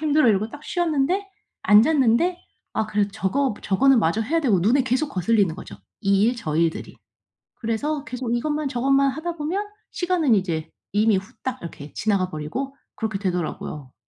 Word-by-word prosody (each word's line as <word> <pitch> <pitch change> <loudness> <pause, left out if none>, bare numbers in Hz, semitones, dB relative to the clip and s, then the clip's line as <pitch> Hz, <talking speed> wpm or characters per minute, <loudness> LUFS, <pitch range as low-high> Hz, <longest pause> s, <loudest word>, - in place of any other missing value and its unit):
힘들어." 305 -4 +3
이러고 210 +1 +2
딱 290 +3 -11
쉬었는데 345 +3 0 0.4
앉았는데 265 +9 +4 0.4
아 220 - 0
그래도 205 -1 0
저거 220 +6 0
저거는 260 +6 +4
마저 185 +4 +1
해야 325 +9 0
되고 225 - +3
눈에 245 +8 +3
계속 260 +4 0
거슬리는 195 -2 +2
거죠, 105 - -9 0.3
이 200 +2 +3
일 245 +1 +1
저 155 -9 -3
일들이. 165 -1 -1 0.6
그래서 275 +6 -2
계속 250 -3 -3
이것만 300 +3 -1
저것만 275 +2 +2
하다 330 +4 -4
보면 360 +8 -2 0.3
시간은 340 -9 +2
이제 165 -5 -1 0.2
이미 210 -1 +3
후딱 255 +5 -6
이렇게 150 -3 -9
지나가 195 -4 0
버리고 180 - -5 0.2
그렇게 220 -3 -2
되더라고요. 165 -7 -4
230 Hz, 370 characters per minute, -23 LUFS, 195-290 Hz, 0.6 s, 앉았는데